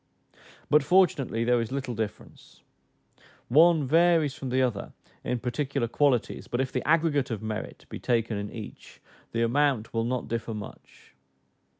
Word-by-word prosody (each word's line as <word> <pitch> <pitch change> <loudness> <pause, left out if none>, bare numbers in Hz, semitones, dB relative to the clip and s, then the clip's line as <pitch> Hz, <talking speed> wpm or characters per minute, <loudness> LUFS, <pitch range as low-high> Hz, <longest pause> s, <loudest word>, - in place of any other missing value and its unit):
But 150 +1 +5
fortunately 155 -8 +2
there 120 0 +2
is 115 - -5
little 135 -2 -3
difference: 110 -2 -7 0.9
one 160 +3 +5
varies 165 0 +3
from 135 - -6
the 130 +1 +2
other 115 -6 -2 0.3
in 125 - -1
particular 125 +1 -2
qualities; 130 -1 0
but 120 - -3
if 130 -1 -1
the - - -1
aggregate 155 -4 +2
of 110 -3 -4
merit 110 0 -5
be - - -8
taken 115 -2 0
in 100 0 -4
each, 110 -3 -10 0.3
the 115 0 0
amount 130 -2 +1
will 115 -1 0
not 125 0 -2
differ 115 -1 -3
much. 105 -9 -11
125 Hz, 155 wpm, -27 LUFS, 115-145 Hz, 0.9 s, But